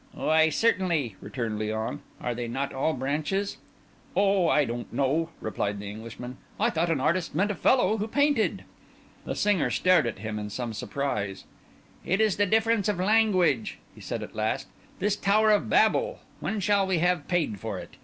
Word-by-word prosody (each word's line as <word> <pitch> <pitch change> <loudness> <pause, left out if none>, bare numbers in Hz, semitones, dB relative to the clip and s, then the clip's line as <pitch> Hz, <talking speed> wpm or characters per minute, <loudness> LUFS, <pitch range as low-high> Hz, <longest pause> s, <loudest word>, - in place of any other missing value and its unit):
"Why, 160 0 +3
certainly!" 170 - +1
returned 110 0 -4
Léon. 110 +1 -2 0.2
"Are 120 - -2
they 120 0 -4
not 135 +4 -3
all 140 +4 0
branches?" 155 +10 -2 0.6
"Oh! 195 -3 +3
I 150 -2 +4
didn't 120 0 -5
know," 150 +5 0
replied 105 -1 -2
the 100 - -7
Englishman. 115 +4 -8 0.2
"I - - +2
thought 170 0 0
an 160 -4 +1
artist 165 +3 0
meant 200 +5 +2
a - - -1
fellow 220 0 +3
who 210 +1 -2
painted." 285 -1 +1 0.6
The - - -3
singer 205 -6 +2
stared 180 -8 +3
at 115 - -4
him 105 +1 -4
in 105 0 -5
some 120 +1 -4
surprise. 105 -6 -3 0.6
"It 190 +3 0
is 215 -3 +2
the 205 0 +2
difference 220 0 +2
of 205 - 0
language," 185 - +2 0.2
he - - -15
said - - -4
at - - -9
last. 110 +5 -1 0.3
"This 205 +2 +1
Tower 215 +2 +3
of 210 - +2
Babel, 485 - +3 0.2
when 220 - -2
shall 200 0 +2
we 190 -2 +1
have 175 -2 +1
paid 160 - 0
for - - -4
it? - - -9
165 Hz, 180 wpm, -27 LUFS, 120-200 Hz, 0.6 s, I